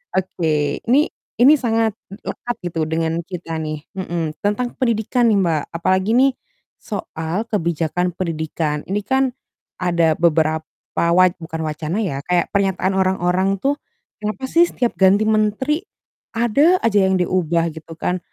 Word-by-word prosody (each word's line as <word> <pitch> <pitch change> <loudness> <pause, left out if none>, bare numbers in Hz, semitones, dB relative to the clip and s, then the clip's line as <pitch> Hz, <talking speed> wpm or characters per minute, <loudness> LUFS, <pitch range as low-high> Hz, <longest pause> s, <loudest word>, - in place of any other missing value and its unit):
Oke 155 -6 0
ini 285 +7 +4 0.3
ini 270 +5 +8
sangat 225 -3 +1 0.3
lekat 240 0 -4
gitu 170 -2 -3
dengan 165 +1 -1
kita 170 -3 -6
nih, 155 -1 -4 0.2
mhm. 170 -4 -3
Tentang 210 +4 -1
pendidikan 235 0 +1
nih, 200 - +3
Mbak, 165 -5 +1
apalagi 185 +4 +1
nih 270 +2 +5 0.5
soal 190 0 -4
kebijakan 175 -3 -1
pendidikan. 160 -3 -2
Ini 195 +2 0
kan 265 +3 +2 0.6
ada 170 -3 +2
beberapa 160 -1 +2 0.3
wa 170 +2 +4 0.2
bukan 160 -1 -5
wacana 155 +4 -3
ya 140 -9 -2
kayak 180 -1 +1
pernyataan 195 -2 +1
orang-orang 190 0 +1
tuh, 280 +7 0 0.4
"Kenapa 215 +5 -3
sih 340 +1 +5
setiap 245 -7 -1
ganti 195 +2 +5
menteri 215 +7 +1 0.6
ada 255 +10 +4
aja 210 -3 +3
yang 190 - +2
diubah?" 170 -2 +1
gitu 160 +1 -10
kan, 180 +3 -1
185 Hz, 140 wpm, -20 LUFS, 165-215 Hz, 0.6 s, ini